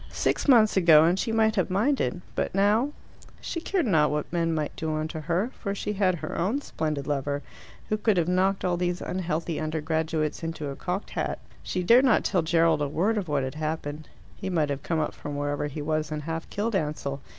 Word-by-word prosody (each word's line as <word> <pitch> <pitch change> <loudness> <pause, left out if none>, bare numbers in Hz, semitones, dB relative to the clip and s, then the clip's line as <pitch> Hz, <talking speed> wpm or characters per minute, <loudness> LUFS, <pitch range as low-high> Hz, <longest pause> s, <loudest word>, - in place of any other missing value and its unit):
Six - - -1
months 230 -6 +6
ago 165 -5 +7
and 175 +3 +3
she 230 - -1
might 220 -1 +3
have 185 - +1
minded; 205 -1 +1
but - - -2
now 210 +7 +3 0.5
she 335 - -4
cared 365 -1 0
not 160 -8 +3
what 150 +3 -3
men 165 -1 +1
might 155 -2 -2
do 160 -1 -2
unto 155 +1 -3
her, 175 +9 -1
for 200 -2 -4
she 210 +1 -3
had 190 -3 +2
her 155 -2 -6
own 205 +11 0
splendid 150 - -3
lover, 145 0 -2 0.5
who 215 - +1
could 210 -2 +2
have 170 -2 +2
knocked 190 +2 +1
all 175 -1 +1
these 175 0 -1
unhealthy 170 -2 -2
undergraduates 155 0 -1
into 165 -3 -4
a 140 - -5
cocked 185 +6 -4
hat. - - -2 0.2
She 185 - -2
dared 240 +8 +6
not 250 - +4
tell 185 - +1
Gerald 165 -1 +3
a 145 - +1
word 190 +10 +1
of 200 -4 -2
what 145 -3 0
had 130 - -3
happened: 155 -1 -4 0.3
he 195 - -5
might 155 -5 +1
have 140 0 -3
come 165 +1 -1
up 155 - -1
from 145 -1 -6
wherever 145 0 -1
he 145 +1 -5
was 155 0 -1
and 150 -1 -3
half 165 +1 -4
killed 215 +2 -2
Ansell. 150 -4 -2
165 Hz, 215 wpm, -26 LUFS, 155-195 Hz, 0.5 s, ago